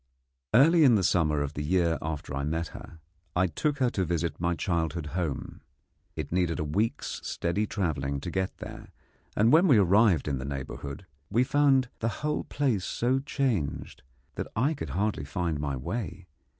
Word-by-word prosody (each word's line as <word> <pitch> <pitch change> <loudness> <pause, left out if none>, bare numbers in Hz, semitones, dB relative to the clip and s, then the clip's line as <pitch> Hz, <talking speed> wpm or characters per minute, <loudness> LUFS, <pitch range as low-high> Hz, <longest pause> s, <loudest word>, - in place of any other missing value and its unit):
Early 160 +6 +6
in 125 -5 +7
the 100 - +2
summer 75 -5 +2
of 70 +1 -5
the 75 - -4
year 85 -1 +1
after 75 -3 -4
I 70 - -2
had 70 - -2
met 80 +2 -1
her, 85 - -11 0.4
I 90 +1 +3
took 140 - -1
her 125 -3 +2
to 95 - 0
visit 85 -1 -2
my 85 0 0
childhood 85 -2 -1
home. 85 -6 -3 0.5
It 75 -3 -5
needed 85 -2 +1
a - - 0
week's 100 +10 -1
steady 100 +5 -1
travelling 70 -9 -1
to 85 - -5
get 95 +1 -2
there, - - -9 0.5
and 110 +3 +5
when 165 +5 +6
we 135 - +6
arrived 100 -2 +4
in 70 -3 -1
the - - -5
neighbourhood 70 +3 -6 0.2
we 120 +4 +3
found 135 -2 +3
the 115 - 0 0.2
whole 150 0 -1
place 130 -10 0
so 125 +6 0
changed 130 - -2 0.3
that - - -4
I 135 +8 +2
could 145 - -6
hardly 105 -7 0
find 80 +2 -2
my 70 -2 -2
way. 95 - -4
90 Hz, 180 wpm, -28 LUFS, 75-115 Hz, 0.5 s, in